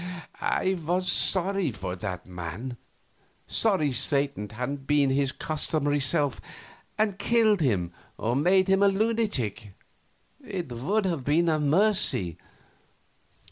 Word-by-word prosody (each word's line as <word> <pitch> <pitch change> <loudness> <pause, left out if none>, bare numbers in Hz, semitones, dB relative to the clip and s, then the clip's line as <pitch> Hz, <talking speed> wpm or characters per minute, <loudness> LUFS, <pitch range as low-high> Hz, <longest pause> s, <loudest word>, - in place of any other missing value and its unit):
I 190 - +1
was 180 +3 0
sorry 190 -4 +1
for 95 -4 -5
that 90 -2 -5
man; 90 +8 -6 0.7
sorry 190 -10 +1
Satan 140 -3 0
hadn't 135 +5 -5
been 145 -2 +3
his 135 0 +1
customary 145 -1 -1
self 140 -1 +1 0.6
and 210 -2 0
killed 215 -3 +3
him 95 - +1 0.3
or 120 +2 -1
made 185 +7 +3
him 195 0 +3
a 200 - +6
lunatic. 195 - -1 0.7
It 175 -8 -5
would 170 - -1
have 165 -8 -1
been 165 +5 +2
a 155 -1 +1
mercy. 150 - +2
145 Hz, 120 wpm, -27 LUFS, 125-190 Hz, 0.7 s, a